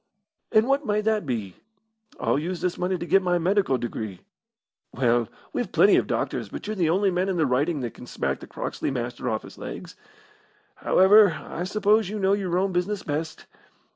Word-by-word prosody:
"And 220 +1 +4
what 275 +2 +2
may 210 -4 0
that 215 -5 0
be?" 110 -7 -3 0.6
"I'll - - +1
use 175 +3 -4
this 180 0 -2
money 180 +1 0
to 170 - -5
get 195 +2 +4
my 180 -1 +1
medical 185 -5 +2
degree." 110 -5 -5 0.7
"Well, 120 -2 +1 0.3
we've - - -2
plenty - - +5
of - - +1
doctors, - - -2
but - - -7
you're 215 +1 -3
the 170 -5 +1
only 190 +3 +2
man 180 +2 0
in 185 - -1
the 160 - +3
Riding 140 +4 0
that 120 -2 -4
could 125 - -12
smack - - -2
the - - -11
Croxley - - -4
Master 120 -1 -3
off 110 -1 -2
his - - -13
legs. - - -8 0.8
However, 200 0 +5
I 175 - -4
suppose 210 +1 +2
you 215 - -4
know 195 -1 +2
your 185 -3 0
own 190 +1 +1
business 185 +3 -1
best. 155 +2 -4
180 Hz, 195 wpm, -25 LUFS, 135-200 Hz, 0.8 s, plenty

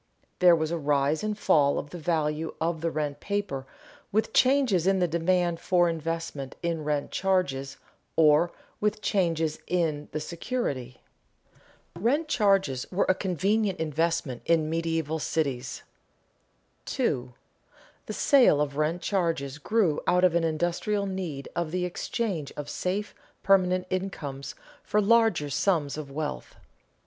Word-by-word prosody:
There 180 -1 +7
was 160 0 -1
a 170 - -1
rise 145 +2 +1
and 210 -1 -2
fall 140 -8 +3
of 145 - -5
the 175 - -7
value 155 -1 -1
of 165 -1 -1
the 165 - 0
rent 150 -3 -3
paper 195 -10 -3 0.4
with 220 +2 0
changes 255 - +3
in 195 0 +4
the 180 -1 +2
demand 170 +1 +1
for 175 -1 +3
investment 165 -4 -4
in 165 -2 -1
rent 150 -1 -1
charges 145 -8 0 0.4
or 155 +2 +5 0.3
with 210 0 -1
changes 165 -5 0
in 160 -4 -1
the 155 - -2
security. 150 - -4 0.9
[Sidenote: 170 - -10
Rent 290 +7 +2
charges 195 - +1
were 190 - +1
a - - +6
convenient 195 +2 0
investment 160 -4 -1
in 160 -2 +2
medieval 165 -1 -1
cities] 135 -6 -2 1.0
2. 130 - -1 0.7
_The - - -4
sale 260 - +5
of 145 -1 -1
rent 160 +4 0
charges 165 -8 -1
grew 190 -2 +1
out 180 0 +3
of 180 -2 +5
an 170 -1 +2
industrial 175 +6 0
need 180 -8 -4
of 170 -2 -1
the 180 +2 -1
exchange 180 - -3
of 145 0 -5
safe 195 +6 -2 0.3
permanent 185 -2 +3
incomes 150 -8 -4 0.3
for 210 - +1
larger 210 -8 +3
sums 145 -1 +1
of 150 -2 -6
wealth. 140 - -5
165 Hz, 140 wpm, -27 LUFS, 150-190 Hz, 1.0 s, There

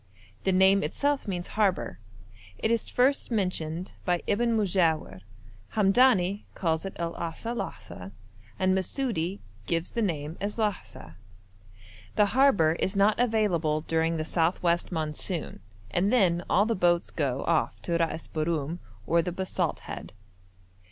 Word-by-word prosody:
The 190 - +3
name 190 +1 +5
itself 285 +3 -1
means 175 -3 -3
'harbour.' 195 - 0 0.6
It 220 - 0
is 230 -1 0
first 265 +3 +2
mentioned 180 -5 -2
by 175 -1 0
Ibn 230 +2 +1
Modjawir; 170 - +1 0.5
Hamdani 205 -2 +3
calls 165 -1 -1
it 195 - -5
El 170 0 -3
Asa 170 +8 -4
Lasa, 90 - -7 0.5
and 185 0 +2
Masudi 190 - -1 0.3
gives 165 0 -1
the 235 - -1
name 160 -5 -2
as 205 +2 -3
Lahsa. 205 - -3 1.0
The 210 - +5
harbour 200 - +4
is 190 - 0
not 200 +3 +3
available 190 -10 +1
during 165 +1 0
the 155 - -2
south 165 +2 0
west 170 +1 +1
monsoon, 160 +1 -3 0.3
and 195 +4 +1
then 180 -8 +3
all 200 +3 +4
the 230 - +1
boats 175 -3 +2
go 135 -4 -1
off 170 -2 +1
to 170 -1 0
Ras 165 -1 -2
Borum 160 0 -2 0.3
or 170 +1 +3
the 175 +2 -3
Basalt 185 +1 -2
Head. - - -8
180 Hz, 140 wpm, -27 LUFS, 165-210 Hz, 1.0 s, name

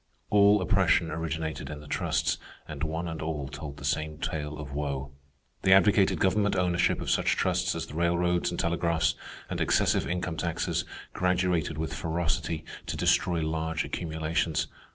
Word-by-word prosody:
All 100 -1 +6
oppression 95 -4 +3
originated 80 -1 -3
in 75 -1 -6
the 75 - -12
trusts, - - 0 0.3
and 75 -2 -7
one 80 +2 -2
and 80 -1 -5
all 75 -3 -3
told 70 +1 -7
the - - -8
same 75 0 -1
tale 75 -1 -3
of 70 -2 -7
woe. 70 -2 -3 0.5
They 95 - +5
advocated 95 0 +5
government 100 +2 +2
ownership 90 -1 +2
of - - -1
such - - +2
trusts 90 0 +1
as 80 0 -3
the 80 - -11
railroads 85 +1 +1
and 85 - -4
telegraphs, 85 -1 +1 0.3
and - - -3
excessive - - +2
income 90 -2 -2
taxes, 85 0 -1 0.3
graduated 90 -3 +1
with 80 0 -3
ferocity, 80 0 -2 0.2
to - - -3
destroy 85 -2 +2
large 80 +1 -1
accumulations. 80 -1 -1
80 Hz, 155 wpm, -28 LUFS, 80-90 Hz, 0.5 s, All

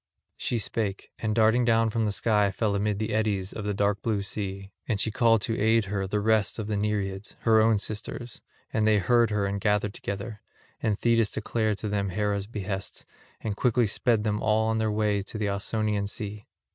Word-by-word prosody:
She 120 - -1
spake, 105 -2 -2
and 110 -1 -1
darting 110 +2 +4
down 115 -1 +3
from 115 0 0
the 105 - 0
sky 105 -1 +2
fell 105 +1 0
amid 100 0 0
the 110 +1 -2
eddies 105 -3 0
of 105 - -5
the 105 - 0
dark 100 +1 +1
blue 110 -4 0
sea; 95 -1 -5 0.2
and 110 -4 0
she 110 - +1
called 115 -1 +3
to 115 - -1
aid 110 0 +3
her 95 -1 -2
the 105 +2 0
rest 110 0 +2
of 110 - -3
the 105 0 -2
Nereids, 100 -1 -2
her 110 -1 +5
own 110 0 +4
sisters; 110 +3 -5 0.3
and 110 0 +2
they 110 -1 +5
heard 115 +4 +3
her 105 -2 0
and 100 0 -2
gathered 105 0 +1
together; 100 +2 -5 0.4
and 105 -2 +1
Thetis 115 -2 +3
declared 110 -1 -1
to 105 - -4
them 100 -1 -1
Hera's 100 +1 -1
behests, 100 -3 -5 0.4
and 105 -2 -3
quickly 120 +1 +2
sped 110 +1 +1
them 105 -1 0
all 110 0 +2
on 110 0 +1
their 110 -1 +1
way 105 -1 +1
to 100 +3 -6
the 105 -1 -1
Ausonian 105 0 -1
sea. 105 0 -6
105 Hz, 205 wpm, -27 LUFS, 100-110 Hz, 0.4 s, her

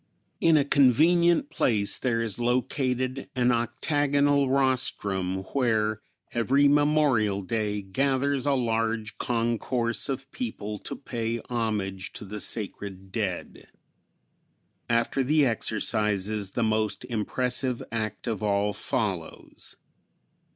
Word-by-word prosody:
In 165 -2 +5
a 140 - +3
convenient 170 - +4
place 105 -4 +2
there 115 -3 0
is 110 0 -2
located 130 +1 -1
an 125 -1 +3
octagonal 140 +3 +1
rostrum, 100 -8 0
where 110 -5 +1 0.3
every 135 +5 +3
Memorial 145 -9 +3
Day 105 0 -2
gathers 135 +6 0
a 140 - +3
large 115 -2 -1
concourse 115 0 -1
of 135 0 -4
people 105 - -5
to - - -6
pay 115 -3 -3
homage 105 -5 -2
to - - -6
the 105 +2 -6
sacred 95 -3 -3
dead. 95 -5 -4 1.2
After 120 +3 +1
the 150 +2 +3
exercises 105 -3 0
the 120 - 0
most 110 0 0
impressive 125 +2 -1
act 110 -2 -3
of 110 -5 -2
all 105 0 +1
follows. 95 -10 -4
115 Hz, 110 wpm, -27 LUFS, 105-135 Hz, 1.2 s, In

